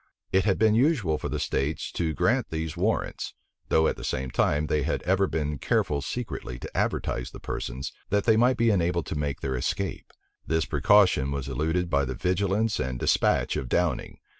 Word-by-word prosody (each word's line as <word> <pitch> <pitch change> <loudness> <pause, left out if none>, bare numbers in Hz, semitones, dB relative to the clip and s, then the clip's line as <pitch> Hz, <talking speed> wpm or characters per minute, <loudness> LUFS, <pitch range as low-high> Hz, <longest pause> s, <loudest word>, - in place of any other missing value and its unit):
It 95 0 +3
had 100 -3 +2
been 110 0 +4
usual 115 - +2
for - - -4
the - - -2
states 70 +4 -2
to 80 -3 -2
grant 120 +8 +1
these 80 -1 -3
warrants; 100 +6 -1 0.3
though 80 - +4
at - - -1
the - - -8
same 65 -1 -2
time, 75 +4 +1
they 75 -1 0
had - - -1
ever 95 +1 +2
been 75 -4 -2
careful 70 -1 +1
secretly 70 - -5
to - - -9
advertise - - -1
the - - -11
persons, 65 +2 -5 0.2
that 100 0 +2
they 110 - +4
might 125 +3 +3
be 115 -1 +3
enabled 85 -3 +1
to - - -4
make 75 -2 -2
their 65 -1 -2
escape. 60 - -3 0.4
This 80 0 +1
precaution 75 -2 +4
was 70 -1 -3
eluded 80 +7 0
by 70 -1 +2
the 65 0 -4
vigilance 100 - 0
and 65 -1 -2
despatch - - +2
of 65 - -3
Downing. 85 +2 0
80 Hz, 190 wpm, -27 LUFS, 70-100 Hz, 0.4 s, been